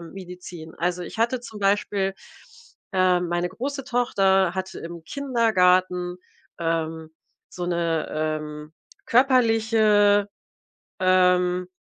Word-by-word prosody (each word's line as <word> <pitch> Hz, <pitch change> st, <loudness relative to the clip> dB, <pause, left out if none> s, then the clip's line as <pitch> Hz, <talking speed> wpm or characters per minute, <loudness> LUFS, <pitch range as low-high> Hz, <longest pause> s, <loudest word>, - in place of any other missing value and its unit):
Medizin. 175 Hz, -2 st, -10 dB
Also, 180 Hz, +1 st, -2 dB
ich -, -, -9 dB
hatte 235 Hz, +2 st, +1 dB
zum 215 Hz, -3 st, -10 dB
Beispiel 195 Hz, -1 st, 0 dB, 0.8 s
ähm, 180 Hz, -2 st, +2 dB
meine 175 Hz, +1 st, -1 dB
große 275 Hz, +6 st, -5 dB
Tochter 195 Hz, -7 st, +2 dB
hatte 190 Hz, 0 st, -5 dB
im 170 Hz, 0 st, -8 dB
Kindergarten, 185 Hz, -, +1 dB, 0.4 s
ähm, 160 Hz, -1 st, -2 dB, 0.4 s
so 175 Hz, -1 st, -5 dB
'ne, 170 Hz, -2 st, -1 dB
ähm, 155 Hz, 0 st, -4 dB, 0.3 s
körperliche, 220 Hz, -5 st, +3 dB, 0.7 s
ähm 180 Hz, -1 st, +3 dB
185 Hz, 95 wpm, -24 LUFS, 175-210 Hz, 0.8 s, körperliche